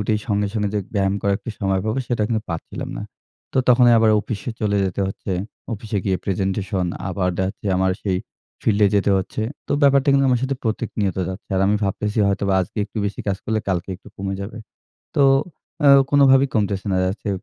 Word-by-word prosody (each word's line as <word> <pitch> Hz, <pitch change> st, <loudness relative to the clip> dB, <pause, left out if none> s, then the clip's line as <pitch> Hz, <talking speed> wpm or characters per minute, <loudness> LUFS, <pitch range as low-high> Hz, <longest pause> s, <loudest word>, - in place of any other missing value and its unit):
উঠেই 105 Hz, +1 st, 0 dB
সঙ্গে, 105 Hz, -1 st, +1 dB
সঙ্গে 105 Hz, -2 st, 0 dB
যেগ 100 Hz, -, -1 dB
ব্যায়াম 95 Hz, -1 st, +1 dB
করার 100 Hz, 0 st, +2 dB
একটু 120 Hz, -, -7 dB
সময় 95 Hz, -1 st, +1 dB
পাবো, 110 Hz, +4 st, -1 dB
সেটা 120 Hz, -3 st, 0 dB
কিন্তু 110 Hz, -2 st, 0 dB
পাচ্ছিলাম 85 Hz, -, -5 dB
না। -, -, -4 dB, 0.5 s
তো -, -, +1 dB
তখনই 120 Hz, -1 st, +6 dB
আবার 110 Hz, -1 st, +4 dB
অফিসে 115 Hz, +5 st, -5 dB
চলে 105 Hz, -2 st, +1 dB
যেতে 95 Hz, +1 st, -2 dB
হচ্ছে। 95 Hz, 0 st, -5 dB, 0.4 s
অফিসে 105 Hz, 0 st, -3 dB
গিয়ে 95 Hz, -2 st, +1 dB
presentation 95 Hz, -1 st, -1 dB, 0.2 s
আবার 90 Hz, 0 st, -1 dB
দেখা 95 Hz, -, +1 dB
যাচ্ছে 100 Hz, +1 st, -8 dB
আমার 95 Hz, 0 st, +2 dB
সেই 95 Hz, -3 st, 0 dB, 0.5 s
field 105 Hz, -1 st, +2 dB
এ -, -, +7 dB
যেতে 100 Hz, 0 st, +2 dB
হচ্ছে। 95 Hz, -, -3 dB, 0.3 s
তো -, -, 0 dB
ব্যাপারটা 140 Hz, 0 st, +4 dB
কিন্তু 140 Hz, 0 st, +4 dB
আমার 125 Hz, -, +2 dB
সাথে 130 Hz, 0 st, -1 dB
প্রত্যেক 110 Hz, 0 st, -1 dB
নিয়ত 95 Hz, -2 st, 0 dB
যাচ্ছে। 95 Hz, +2 st, -7 dB
আর -, -, +2 dB
আমি 105 Hz, +1 st, +3 dB
ভাবতেছি 105 Hz, +2 st, -2 dB
হয়তো 100 Hz, +1 st, 0 dB, 0.2 s
আজকে 90 Hz, -, -5 dB
একটু 110 Hz, -, -16 dB
বেশি 100 Hz, -, -4 dB
কাজ 95 Hz, -, +1 dB
করলে 110 Hz, -1 st, 0 dB
কালকে 90 Hz, -1 st, -1 dB
একটু -, -, -16 dB
কমে 95 Hz, 0 st, -3 dB
যাবে। 105 Hz, +4 st, -6 dB, 0.6 s
তো 140 Hz, -, +5 dB, 0.6 s
অ্যা 145 Hz, -1 st, +7 dB, 0.2 s
কোনোভাবেই 135 Hz, -1 st, +5 dB
কমতেছে 100 Hz, -3 st, 0 dB
না। -, -, +1 dB
দেখা-যাচ্ছে 95 Hz, +3 st, -2 dB
105 Hz, 205 wpm, -21 LUFS, 95-115 Hz, 0.6 s, এ